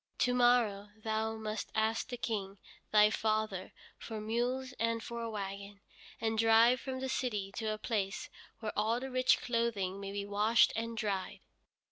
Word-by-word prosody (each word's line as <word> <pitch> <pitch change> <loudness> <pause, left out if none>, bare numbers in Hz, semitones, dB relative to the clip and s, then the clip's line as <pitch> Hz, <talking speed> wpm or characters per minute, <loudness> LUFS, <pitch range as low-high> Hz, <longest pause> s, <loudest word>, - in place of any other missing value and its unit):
To 250 - +2
morrow 240 -5 +3
thou 220 0 -1
must 215 -1 -4
ask 220 +2 +1
the 245 - -4
King, 205 -4 -3 0.3
thy 210 0 +6
father, 215 -3 -1 0.3
for 220 -2 -6
mules 245 +4 -1
and 230 0 0
for 235 0 -5
a 230 - -3
wagon, 200 -1 -6 0.4
and 220 -1 0
drive 225 +2 +6
from 260 -1 -4
the 265 - -2
city 210 -7 -2
to 225 -2 -2
a 215 - -2
place 205 -3 -2 0.3
where 215 -2 -3
all 220 +3 +1
the 265 +1 -6
rich 255 0 +3
clothing 230 -6 -1
may 195 0 -5
be 200 0 -3
washed 210 +3 +4
and 230 +1 -3
dried." 200 -4 -2
220 Hz, 165 wpm, -33 LUFS, 205-235 Hz, 0.4 s, thy